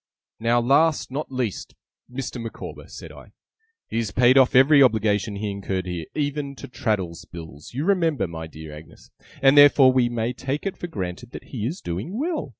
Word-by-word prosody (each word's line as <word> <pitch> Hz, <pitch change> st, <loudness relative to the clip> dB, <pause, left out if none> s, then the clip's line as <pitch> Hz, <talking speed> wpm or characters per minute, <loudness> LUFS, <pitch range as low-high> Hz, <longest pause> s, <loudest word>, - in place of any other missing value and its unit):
'Now, 115 Hz, +1 st, +2 dB
last, 145 Hz, +5 st, +2 dB
not 145 Hz, +2 st, -4 dB
least, 125 Hz, -6 st, -4 dB, 0.4 s
Mr. 125 Hz, -1 st, -5 dB
Micawber,' 115 Hz, -1 st, -8 dB
said -, -, -10 dB
I. -, -, -15 dB, 0.5 s
'He -, -, -4 dB
has 115 Hz, -3 st, -1 dB
paid 125 Hz, +4 st, +4 dB
off 130 Hz, -2 st, +5 dB
every 140 Hz, +3 st, +6 dB
obligation 110 Hz, -4 st, +2 dB
he 105 Hz, 0 st, -3 dB
incurred 95 Hz, -1 st, -3 dB
here 90 Hz, -3 st, -5 dB
even 145 Hz, -1 st, -2 dB
to -, -, -9 dB
Traddles's 105 Hz, -8 st, -3 dB
bill, 80 Hz, -4 st, -10 dB
you 140 Hz, +6 st, -3 dB
remember 165 Hz, -, +1 dB
my 80 Hz, -1 st, -7 dB
dear 80 Hz, -1 st, -10 dB
Agnes 75 Hz, 0 st, -15 dB, 0.3 s
and 135 Hz, +1 st, +6 dB
therefore 145 Hz, -2 st, +7 dB
we 125 Hz, -2 st, +3 dB
may 120 Hz, 0 st, -2 dB
take 135 Hz, +6 st, -4 dB
it 195 Hz, -, -2 dB
for 175 Hz, -, -6 dB
granted 95 Hz, -, -6 dB
that -, -, -8 dB
he 115 Hz, -3 st, -2 dB
is 165 Hz, +8 st, -5 dB
doing 95 Hz, -, -5 dB
well. 315 Hz, -, -2 dB
120 Hz, 185 wpm, -23 LUFS, 100-140 Hz, 0.5 s, therefore